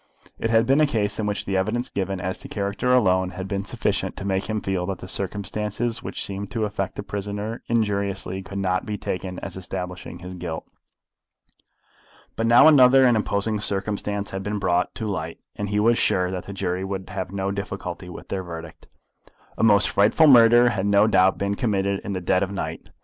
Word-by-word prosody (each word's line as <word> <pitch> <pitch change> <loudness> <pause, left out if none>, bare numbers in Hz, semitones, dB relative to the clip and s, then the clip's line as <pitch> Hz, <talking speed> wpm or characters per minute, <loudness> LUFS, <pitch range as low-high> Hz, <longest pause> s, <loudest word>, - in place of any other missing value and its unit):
It 115 - -1
had 115 0 +4
been 135 +5 +3
a 155 - +5
case 105 -5 -1
in 105 - -1
which 105 0 -2
the 100 - -2
evidence 110 +6 0
given 95 -1 -3
as 95 +1 -3
to - - -8
character 100 +5 -1
alone 95 -7 +3
had 95 0 -4
been 100 -1 -2
sufficient 100 -3 -2
to 100 - -6
make 95 -1 0
him 110 0 0
feel 95 -3 -2
that 95 -2 -3
the 95 - -10
circumstances 105 +4 -3
which - - -5
seemed 100 0 -5
to 110 -2 -1
affect 100 -2 -3
the - - -5
prisoner 105 +3 -4
injuriously 100 -4 -1
could 95 +1 -8
not 95 -1 0
be 105 -1 -3
taken 90 -1 -4
as 95 - -6
establishing 90 -1 -6
his 90 +1 -9
guilt. 85 -3 -6 1.7
But 115 - 0
now 120 +6 +7
other 135 -3 +7
and 120 -2 +5
imposing 105 0 0
circumstances 100 0 -2
had 95 - -4
been 105 +2 -3
brought 90 -2 0
to 110 - -4
light, 85 -6 -4 0.2
and 105 -1 -4
he 105 0 +1
was 115 +2 +3
sure 90 0 +2
that 90 -1 -5
the 100 - -7
jury 95 -1 -2
would 95 -1 -5
have 95 -1 -4
no 100 0 -2
difficulty 100 -2 -5
with 90 - -10
their 95 - -2
verdict. 85 -2 -9 0.7
A - - -4
most 105 -3 +7
frightful 105 +10 +4
murder 120 -3 +7
had 100 -4 -1
no 100 +1 +5
doubt 95 -3 +4
been 100 0 -1
committed 100 -3 0
in 100 - -4
the 95 - -3
dead 90 +1 +2
of 95 - 0
the 100 - -6
night. - - -5
100 Hz, 205 wpm, -24 LUFS, 95-105 Hz, 1.7 s, now